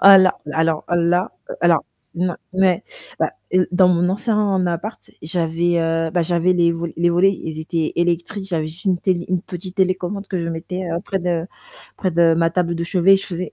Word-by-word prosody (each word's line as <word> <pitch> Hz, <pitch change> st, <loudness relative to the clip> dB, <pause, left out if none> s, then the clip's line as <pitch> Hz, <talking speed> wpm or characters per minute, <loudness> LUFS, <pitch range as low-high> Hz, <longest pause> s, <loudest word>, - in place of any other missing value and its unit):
alors 190 Hz, -1 st, +7 dB
alors, 160 Hz, -1 st, 0 dB
là, 175 Hz, +1 st, +1 dB, 0.3 s
alors, -, -, +3 dB, 0.3 s
non, 180 Hz, 0 st, -1 dB, 0.2 s
ouais, 185 Hz, -2 st, +2 dB, 0.4 s
bah, -, -, +1 dB, 0.2 s
heu, 185 Hz, -1 st, +4 dB
dans 180 Hz, 0 st, +5 dB
mon 175 Hz, 0 st, +2 dB
ancien 205 Hz, -2 st, +1 dB
appart, 175 Hz, +6 st, -3 dB, 0.2 s
j'avais, 170 Hz, +1 st, 0 dB
heu, 165 Hz, 0 st, 0 dB
bah, 175 Hz, -, +1 dB
j'avais 175 Hz, +2 st, +2 dB
les 170 Hz, -1 st, +3 dB
volets 165 Hz, 0 st, -4 dB
les 175 Hz, +1 st, +2 dB
volets, 190 Hz, +3 st, +4 dB
ils 160 Hz, -3 st, -6 dB
étaient 160 Hz, -1 st, -2 dB
électriques, 175 Hz, +3 st, -1 dB
j'avais 160 Hz, -4 st, -1 dB
juste 165 Hz, +5 st, -11 dB
une 185 Hz, -2 st, +2 dB
télé 175 Hz, -2 st, 0 dB
une 185 Hz, -2 st, 0 dB
petite 180 Hz, +2 st, -8 dB
télécommande 190 Hz, +1 st, 0 dB
que 185 Hz, -, -2 dB
je 165 Hz, -, -3 dB
mettais, 180 Hz, +3 st, -4 dB
heu, 170 Hz, -, -1 dB
près 195 Hz, -, -2 dB
de 170 Hz, -1 st, -1 dB, 0.5 s
près 185 Hz, -, -1 dB
de 165 Hz, -1 st, +4 dB
ma 165 Hz, 0 st, +2 dB
table 170 Hz, 0 st, 0 dB
de 170 Hz, 0 st, -2 dB
chevet, 185 Hz, +2 st, +4 dB
je 195 Hz, -, -6 dB
faisais 180 Hz, 0 st, -5 dB
175 Hz, 195 wpm, -20 LUFS, 170-185 Hz, 0.5 s, alors